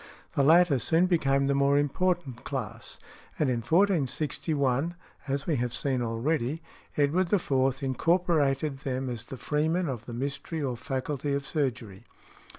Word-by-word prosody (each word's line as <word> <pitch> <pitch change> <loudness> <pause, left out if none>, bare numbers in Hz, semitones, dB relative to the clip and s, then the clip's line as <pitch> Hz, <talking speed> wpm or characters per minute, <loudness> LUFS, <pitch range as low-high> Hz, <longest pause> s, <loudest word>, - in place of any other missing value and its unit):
The - - +2
latter 160 -1 +5
soon 165 +7 +3
became 140 -6 +2
the 140 - +2
more 140 +1 +3
important 145 -3 0
class, 120 -4 -5 0.4
and 145 -4 +1
in 120 - 0
1461 150 - +1 0.3
(as 140 0 -1
we 155 -4 +1
have 120 0 -2
seen 130 -1 -1
already), 120 +5 -1 0.4
Edward 160 +5 +2
IV. 135 -9 +2
incorporated 150 -1 +1
them 130 -1 -3
as 120 -3 -5
"The 135 - -8
Freeman 160 +6 0
of 120 -5 -4
the 120 - -7
Mystery 140 +6 -4
or 130 -3 -1
Faculty 140 +2 -2
of 140 0 -3
Surgery." 125 - -3
140 Hz, 145 wpm, -28 LUFS, 130-160 Hz, 0.4 s, latter